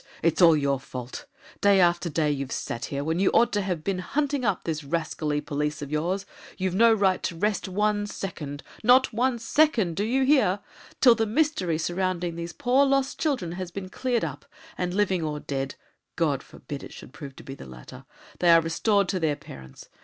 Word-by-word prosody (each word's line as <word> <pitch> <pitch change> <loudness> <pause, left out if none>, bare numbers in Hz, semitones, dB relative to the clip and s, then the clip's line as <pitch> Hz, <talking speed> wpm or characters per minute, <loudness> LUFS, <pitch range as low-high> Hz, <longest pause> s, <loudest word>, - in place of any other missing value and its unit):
it's 165 +2 +2
all 165 -3 +7
your 140 -2 0
fault! 125 -2 -8 0.3
Day 200 -1 +5
after 175 -1 +3
day 155 -1 +1
you've 140 -2 -3
sat 115 - -4
here, 140 0 -3
when 160 +3 -1
you 195 - +4
ought 235 - +4
to 205 - +1
have 180 -5 -3
been 190 +1 -1
hunting 280 +7 -1
up 205 -5 0
these 155 -2 -3
rascally 155 -1 -2
police 150 0 -3
of 140 - -8
yours. 175 +6 -1 0.3
You've 185 -1 -1
no 230 +4 +5
right 200 -4 +2
to 170 - -3
rest 205 +4 -1
one 205 +2 0
second 150 -8 -6 0.2
not 250 +2 +5
one 245 +2 +1
second, 230 - +2
do 200 - 0
you 255 +5 +1
hear? 220 -9 +3 0.4
till 245 - +8
the 225 -1 0
mystery 215 - +1
surrounding 175 0 -2
these 170 0 -5
poor 255 +8 +2
lost 275 -1 +1
children 260 - -1
has 180 0 -5
been 185 +1 -7
cleared 240 0 -1
up, 145 -2 -7 0.3
and, 180 -1 -2
living 190 -2 +1
or 150 -2 -3
dead 135 -2 -4 0.4
God 145 -5 +1
forbid 140 0 -9
it - - -10
should - - -12
prove 140 -3 -9
to - - -12
be 135 - -8
the 135 - -11
latter! 65 -1 -12 0.3
they 175 - +3
are 165 0 +8
restored 195 +5 +1
to 185 - 0
their 155 -3 +1
parents. 65 - -12
180 Hz, 200 wpm, -26 LUFS, 150-210 Hz, 0.4 s, till